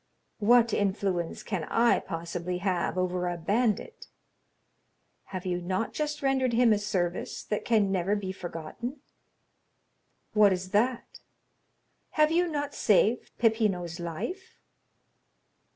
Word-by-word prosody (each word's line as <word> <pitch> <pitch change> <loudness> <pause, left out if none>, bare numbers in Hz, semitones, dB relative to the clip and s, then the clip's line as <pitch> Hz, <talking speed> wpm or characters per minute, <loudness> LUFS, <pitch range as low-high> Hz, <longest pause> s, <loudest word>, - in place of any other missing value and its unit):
"What 235 +1 +5
influence 190 -4 -1
can 190 -7 -3
I 235 +6 +3
possibly 170 +2 -4
have 180 -1 -1
over 180 -1 0
a 175 0 -2
bandit?" 215 - -1 1.2
"Have 185 -1 -6
you 180 -1 -1
not 185 +5 -2
just 300 -1 -3
rendered 265 -2 +2
him 235 -1 +5
a 205 - +1
service 185 -4 -2
that 210 - -2
can 215 -4 +3
never 190 +2 +1
be 195 -2 -3
forgotten?" 190 - -6 1.3
"What 210 -2 +6
is 185 0 -5
that?" 235 +4 0 1.0
"Have 305 0 +5
you 350 +2 +3
not 290 -3 -3
saved 215 +3 +2
Peppino's 200 -7 +1
life?" 175 - -5
205 Hz, 120 wpm, -28 LUFS, 180-240 Hz, 1.3 s, What